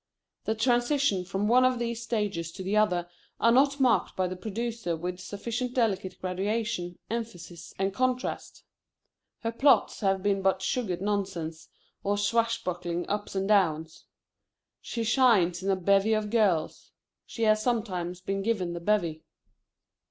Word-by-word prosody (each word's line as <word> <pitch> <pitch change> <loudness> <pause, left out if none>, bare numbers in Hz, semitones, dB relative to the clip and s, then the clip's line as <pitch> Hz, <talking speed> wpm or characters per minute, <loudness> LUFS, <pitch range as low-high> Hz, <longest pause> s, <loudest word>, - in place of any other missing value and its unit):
The 220 - 0
transitions 240 -4 +1
from 195 +2 0
one 250 +3 +5
of 255 0 +3
these 235 -1 -3
stages 205 -8 -2
to 190 - -7
the 195 +3 -1
other 180 -5 +2 0.3
are 230 - +4
not 280 +3 +4
marked 255 -3 +2
by 185 -1 +1
the 185 - -5
producer 220 -1 -3
with 180 +2 -5
sufficient 235 +6 -4
delicate 195 -6 0
graduation, 190 -1 -2
emphasis, 215 -7 -6
and 195 0 0
contrast. 255 +1 -2 0.8
Her 230 - -1
plots 275 +4 +3
have 195 -2 +1
been 200 -1 +1
but 190 0 +1
sugared 190 -4 -1
nonsense, 190 -6 -3 0.3
or 205 +1 +1
swashbuckling 200 -5 -1
ups 205 0 -3
and 195 0 0
downs. 160 -6 +1 0.8
She 230 - -3
shines 215 -8 +3
in 195 - -2
a 195 - +3
bevy 195 +3 +3
of 215 -1 -1
girls. 200 -9 +1 0.3
She 230 - -4
has 215 -1 +4
sometimes 185 -7 -2
been 195 +1 -2
given 195 -5 -1
the 170 - -4
bevy. 170 -4 0
205 Hz, 145 wpm, -28 LUFS, 180-230 Hz, 0.8 s, one